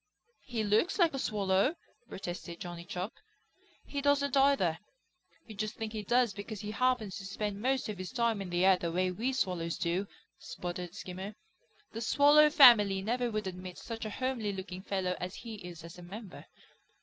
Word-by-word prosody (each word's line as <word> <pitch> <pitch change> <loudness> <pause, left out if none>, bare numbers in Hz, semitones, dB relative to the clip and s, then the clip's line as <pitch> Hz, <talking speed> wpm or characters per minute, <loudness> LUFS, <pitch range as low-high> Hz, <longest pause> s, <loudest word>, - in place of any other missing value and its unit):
"He 235 -4 -3
looks 215 - +2
like 340 -5 +4
a 270 - -3
Swallow," 200 - +1 0.3
protested 175 -2 -6
Johnny 175 -1 -7
Chuck. 180 +4 -4 0.7
"He 280 - -4
doesn't 280 -1 +2
either. 270 - +3 0.7
You 225 - -10
just 215 +1 -3
think 220 0 -5
he 215 - -3
does 240 +1 +2
because 205 +1 -7
he 210 0 -5
happens 235 -5 0
to - - -8
spend 205 +1 -3
most 260 +2 +1
of 210 -3 -5
his 185 - -5
time 235 -5 +1
in 190 - -5
the 175 +1 +2
air 190 -1 +6
the 170 -2 -3
way 185 +2 +1
we 230 +8 -1
Swallows 180 -9 -1
do," 180 +3 -1 0.3
sputtered 175 0 -6
Skimmer. 190 +2 -7 0.6
"The 225 - -6
Swallow 290 +5 +6
family 210 -9 +7
never 240 +3 0
would 215 -2 -2
admit 185 -1 -6
such 230 -1 -6
a 215 - -3
homely 240 -2 -2
looking 190 -1 -6
fellow 190 -2 -1
as 180 +2 -5
he 225 -2 -8
is 170 -2 -9
as 170 +1 -10
a - - -9
member. 195 +3 -9
205 Hz, 185 wpm, -31 LUFS, 185-240 Hz, 0.7 s, family